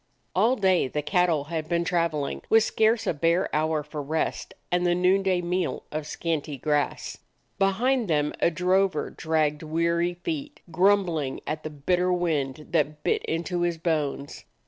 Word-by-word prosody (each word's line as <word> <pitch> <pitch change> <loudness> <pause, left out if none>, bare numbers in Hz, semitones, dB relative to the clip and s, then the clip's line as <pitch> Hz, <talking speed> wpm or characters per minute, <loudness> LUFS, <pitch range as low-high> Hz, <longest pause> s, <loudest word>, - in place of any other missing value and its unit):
All 225 +7 +4
day 190 - +2
the 150 +3 -3
cattle 175 -4 +2
had 155 +1 -4
been 170 -1 +1
traveling, 165 -4 -1
with 225 -1 +6
scarce 220 +1 +2
a - - +1
bare 165 +4 +1
hour 155 0 +1
for 150 0 -6
rest 155 +3 -2 0.2
and 175 0 +2
the 175 -1 +2
noonday 185 0 +2
meal 180 +1 -2
of 155 0 -4
scanty 155 -4 -3
grass. 150 +2 -1 0.4
Behind 230 +5 +2
them 150 -3 +1
a - - +4
drover 185 0 +1
dragged 155 -2 0
weary 170 +2 0
feet, 295 - -5
grumbling 175 -6 +2
at 155 0 -3
the 155 - -5
bitter 180 +5 0
wind 155 -5 -1
that 150 -2 0
bit - - +1
into 170 +2 -2
his 175 -1 0
bones. 150 -4 -2
170 Hz, 155 wpm, -26 LUFS, 155-180 Hz, 0.4 s, with